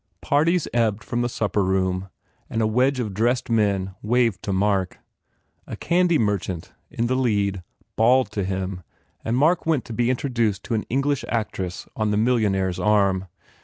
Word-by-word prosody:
Parties 160 +4 +2
ebbed 115 -3 +1
from 120 - -2
the 120 - 0
supper 105 -3 0
room 95 0 0 0.4
and 115 - -2
a 110 - +2
wedge 130 +5 +2
of 110 -5 -3
dressed 120 +4 0
men 100 -4 +1
waved 115 -1 +1
to 100 - -3
Mark. 95 -1 0 0.7
A - - -5
candy 175 -1 +2
merchant 100 - -2 0.2
in 115 - -2
the 125 - 0
lead 100 -7 0 0.3
bawled 125 +1 +3
to 105 -2 -2
him 95 0 -3 0.4
and 115 +2 0
Mark 160 +5 +2
went 155 -6 +1
to 115 - -7
be 120 +2 +1
introduced 120 -6 0
to 120 - -4
an 110 - -1
English 140 +2 0
actress 95 -6 -3
on 110 -1 0
the 105 - +1
millionaire 105 -5 +2
s 90 0 -5
arm. 95 -1 +2
110 Hz, 170 wpm, -23 LUFS, 95-125 Hz, 0.7 s, bawled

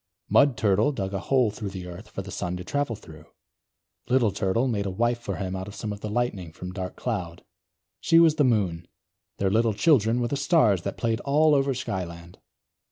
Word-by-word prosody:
Mud 140 -5 +4
Turtle 105 +4 +2
dug 95 -7 -4
a 95 - -1
hole 125 +1 +2
through 105 -1 -5
the 95 -2 -7
earth 90 +3 -10
for 95 - -6
the 95 - -9
Sun 90 -1 -3
to 90 - -7
travel 145 +3 -2
through. 80 -6 -14 0.8
Little 125 -4 +3
Turtle 100 +5 0
made 100 -5 -1
a - - -1
wife 120 +5 0
for 120 - -4
him 95 -1 -4
out 95 +1 -5
of 105 - -9
some 105 -1 -4
of 100 - -9
the 105 - -5
Lightning 105 -7 -2
from 90 +2 -8
Dark 95 -1 -5
Cloud. 90 -8 -4 0.6
She 165 - +3
was 160 -2 +5
the 150 - +4
Moon. 95 -9 +1 0.5
Their 95 -1 0
little 110 0 +2
children 120 -3 +3
were 120 - 0
the - - -1
stars 135 - +3
that 100 - -5
played 115 -1 0
all 150 +3 +3
over 135 -1 +2
Skyland. 85 -7 -6
105 Hz, 210 wpm, -26 LUFS, 95-125 Hz, 0.8 s, was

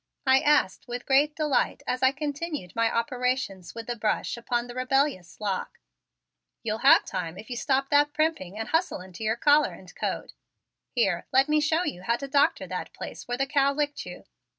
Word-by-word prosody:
I 265 0 +6
asked 290 -10 +2
with 245 0 -5
great 290 +3 +3
delight 300 -5 0
as 255 - -2
I 260 0 +5
continued 290 - -4
my 230 0 +2
operations 245 -6 -2
with 230 -1 -6
the 240 - -3
brush 215 -2 -1
upon 240 0 -2
the 245 - -9
rebellious 255 - 0
lock. 200 -3 -3 0.9
"You'll 220 -1 -2
have - - +6
time 180 -2 -4
if 220 - -10
you - - -2
stop 270 +2 0
that 290 0 +4
primping 295 - -1
and 225 - -4
hustle 330 +3 +1
into 185 +3 -9
your 220 +1 +1
collar 290 +4 +4
and - - -13
coat. - - -3 0.6
Here, 195 -9 0
let 265 +1 +4
me 305 0 +3
show 320 +3 +2
you 280 - -4
how 235 +5 +1
to 275 +3 -6
doctor 280 +1 +2
that - - -5
place - - -8
where 245 0 -2
the 270 - +1
cow 280 0 +2
licked 290 0 -2
you. 180 - -9
255 Hz, 195 wpm, -27 LUFS, 225-290 Hz, 0.9 s, I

